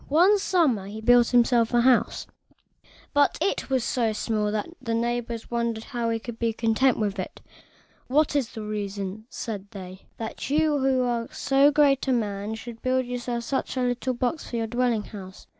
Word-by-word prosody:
One 365 +8 +5
summer 300 - +1
he 210 +2 -7
built 240 +1 +5
himself 240 -1 +3
a 240 - +5
house, 250 0 +2 0.9
but 285 -1 +3
it 395 - -1
was 260 -3 +1
so 235 -3 0
small 210 -1 -1
that 210 -1 -2 0.2
his 230 -2 -1
neighbors 235 0 -2
wondered 235 -2 -1
how 235 -1 -3
he 230 - 0
could 230 0 -8
be 230 -1 0
content 230 +3 +2
with 205 -2 -1
it. 185 - -5 0.7
"What 295 +3 +2
is 265 -6 +1
the 220 -3 -7
reason," 205 0 -4
said 205 -3 -5
they, 190 -2 -10
"that 225 +2 -5
you, 300 0 +2
who 265 -1 +2
are 235 -1 -1
so 275 +1 +3
great 285 -2 +3
a 260 - +3
man, 210 -2 -2
should 230 0 -9
build 255 0 +1 0.4
such 265 +1 -2
a - - +1
little 250 +1 -1
box 245 +2 0
as 320 - -11
this - - -10
for - - -5
your 225 - 0
dwelling 240 -1 0
house?" 190 -3 -10
235 Hz, 190 wpm, -25 LUFS, 220-260 Hz, 0.9 s, One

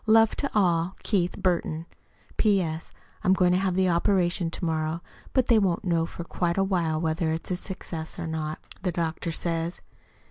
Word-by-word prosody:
Love 225 0 +6
to 280 - -1
all. 175 -2 +2
KEITH 180 -4 +1
BURTON 170 -3 0 0.5
P.S. 180 -7 +1 0.3
I'm 185 - +5
going 180 -2 +4
to 180 - +3
have 190 -2 0
the 190 0 +3
operation 175 0 +2
to 170 - -4
morrow, 160 +1 -1 0.3
but 260 -2 +3
they 230 -3 +5
won't 185 -4 +1
know 165 -2 +2
for 170 - -7
quite 170 +1 -1
a 195 - +4
while 170 -5 +1
whether 160 0 0
it's 175 +2 -2
successful 175 -2 -5
or - - -3
not, 155 -1 -3 0.2
the 180 - 0
doctor 165 0 -2
says. 165 +1 -2
175 Hz, 175 wpm, -27 LUFS, 165-190 Hz, 0.5 s, Love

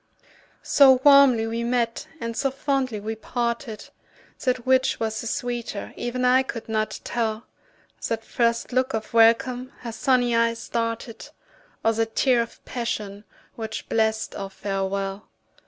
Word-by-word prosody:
So 265 -3 +6
warmly 275 -5 +7
we 230 +1 -2
met 235 -1 -1
and 230 0 -4
so 275 +2 +1
fondly 270 -4 -1
we 215 +2 -4
parted, 235 0 -4 0.5
That 250 -2 0
which 260 0 +3
was 220 -1 -2
the 235 - -5
sweeter 240 -3 -4
even 250 +1 -2
I 255 +1 +5
could 250 -3 -6
not 215 -1 -1
tell, 225 -1 -2 0.6
That 225 -1 -2
first 235 +1 0
look 255 0 +1
of 220 +1 -5
welcome 245 +3 +3
her 235 - -5
sunny 245 0 +2
eyes 230 0 +1
darted, 230 0 -3 0.6
Or 225 - +4
that 225 0 -2
tear 255 -3 +3
of 230 - -8
passion, 210 -4 -4 0.3
which 220 -1 -6
blest 220 -1 0
our 195 -1 -5
farewell. 195 0 -3
230 Hz, 140 wpm, -24 LUFS, 220-250 Hz, 0.6 s, warmly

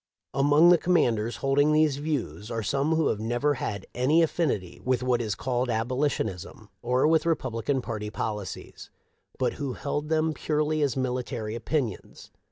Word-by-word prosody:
Among 145 +5 +5
the 175 -1 +6
commanders 120 -10 +1
holding 140 +2 +2
these 155 -2 +3
views 145 -8 -3
are 115 -2 -3
some 140 +8 +1
who 160 -2 +2
have 105 - -1
never 120 +6 0
had 100 -6 -4
any 145 +7 +3
affinity 130 - -1
with 130 -1 0
what 125 -1 +1
is 110 -4 -2
called 125 0 -1
abolitionism 115 - -2
or 125 +4 +2
with 160 0 +3
Re 165 - +4
publican 125 +1 -2
party 105 -2 -4
policies, 105 -3 -5 0.5
but - - 0
who 135 -3 -2
held 145 +3 -3
them 160 0 +1
purely 155 0 0
as 140 -3 0
military 125 -3 -2
opinions. 120 -1 -3
130 Hz, 160 wpm, -27 LUFS, 115-150 Hz, 0.5 s, the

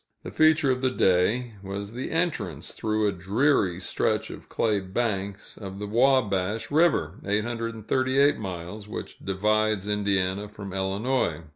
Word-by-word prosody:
The 90 - -7
feature 155 - +4
of 125 0 -1
the 130 - +3
day 115 +3 +2
was 100 +1 -5
the 125 +3 -5
entrance, 165 0 -2
through 110 -1 0
a - - +2
dreary 95 - +1
stretch 90 - 0
of - - -11
clay 110 -3 +1
banks, 100 0 -3
of 95 -2 -7
the 105 - -4
Wabash 110 -3 +2
River 145 - +2
(838 115 +6 +1
miles), 95 +1 -6
which - - -7
divides 105 +1 +1
Indiana 100 -1 0
from 100 -2 -8
Illinois. 95 - 0
105 Hz, 135 wpm, -26 LUFS, 95-120 Hz, -, feature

